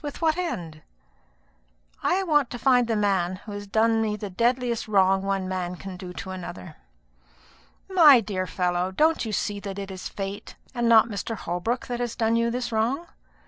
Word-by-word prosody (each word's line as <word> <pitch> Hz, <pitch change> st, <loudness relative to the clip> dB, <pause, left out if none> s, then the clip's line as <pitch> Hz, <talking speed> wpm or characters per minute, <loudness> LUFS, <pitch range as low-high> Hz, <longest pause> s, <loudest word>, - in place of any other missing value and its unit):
With 290 Hz, -1 st, -6 dB
what 320 Hz, -2 st, +2 dB
end?" 180 Hz, -, -4 dB, 1.2 s
"I 385 Hz, +1 st, +1 dB
want 295 Hz, -7 st, +2 dB
to 245 Hz, -, -6 dB
find 245 Hz, -1 st, +3 dB
the 225 Hz, -, 0 dB
man 190 Hz, -4 st, +1 dB
who 215 Hz, -, -8 dB
has 205 Hz, 0 st, -7 dB
done 225 Hz, +2 st, +2 dB
me 215 Hz, -1 st, 0 dB
the 205 Hz, -2 st, -6 dB
deadliest 240 Hz, +3 st, 0 dB
wrong 195 Hz, -2 st, +3 dB
one 195 Hz, -1 st, -1 dB
man 180 Hz, -1 st, -3 dB
can 190 Hz, +1 st, -8 dB
do 180 Hz, -1 st, -8 dB, 0.2 s
another." 175 Hz, -, -8 dB, 1.1 s
"My 325 Hz, -9 st, +7 dB
dear 195 Hz, -4 st, -3 dB
fellow, 180 Hz, 0 st, 0 dB
don't 315 Hz, +8 st, +2 dB
you 220 Hz, -, -3 dB
see 205 Hz, 0 st, -2 dB
that 200 Hz, -1 st, -6 dB
it 195 Hz, -1 st, -5 dB
is 185 Hz, -1 st, -6 dB
fate, 195 Hz, 0 st, -6 dB, 0.2 s
and 240 Hz, -2 st, 0 dB
not 225 Hz, -1 st, +7 dB
Mr. 225 Hz, +1 st, -4 dB
Holbrook, 185 Hz, +7 st, -3 dB
that 245 Hz, -1 st, -4 dB
has 240 Hz, -2 st, -3 dB
done 225 Hz, -1 st, +1 dB
you 230 Hz, 0 st, +2 dB
this 240 Hz, 0 st, -3 dB
wrong? 235 Hz, +9 st, 0 dB
215 Hz, 185 wpm, -25 LUFS, 190-245 Hz, 1.2 s, My